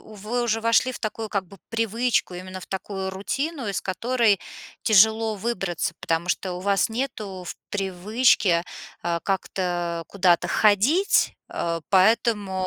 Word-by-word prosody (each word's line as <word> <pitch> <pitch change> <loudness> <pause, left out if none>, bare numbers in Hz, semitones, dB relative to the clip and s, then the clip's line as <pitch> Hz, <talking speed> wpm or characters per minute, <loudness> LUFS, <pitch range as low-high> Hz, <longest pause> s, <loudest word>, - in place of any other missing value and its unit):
вы 215 +3 -4
уже 225 -1 0
вошли 230 +3 +3
в - - -7
такую, 220 0 -4
как 200 -3 -2
бы, 195 +1 -15
привычку, 230 -3 0
именно 185 +1 -7
в - - -11
такую 190 0 -4
рутину, 270 - -3
из 200 - -1
которой 225 +1 +1 0.4
тяжело 220 +1 +4
выбраться, 195 -6 -2
потому 165 +1 -1
что 180 0 -1
у 180 - -6
вас 200 +3 +2
нету 215 -6 -4
в - - -5 0.2
привычке, 195 -1 +2 0.4
э, 170 -1 0
как-то 175 -3 -2
куда-то 180 -3 +2
ходить, 225 - +3 0.2
э, 170 -1 -2
поэтому 195 -1 +2
200 Hz, 135 wpm, -24 LUFS, 185-225 Hz, 0.4 s, тяжело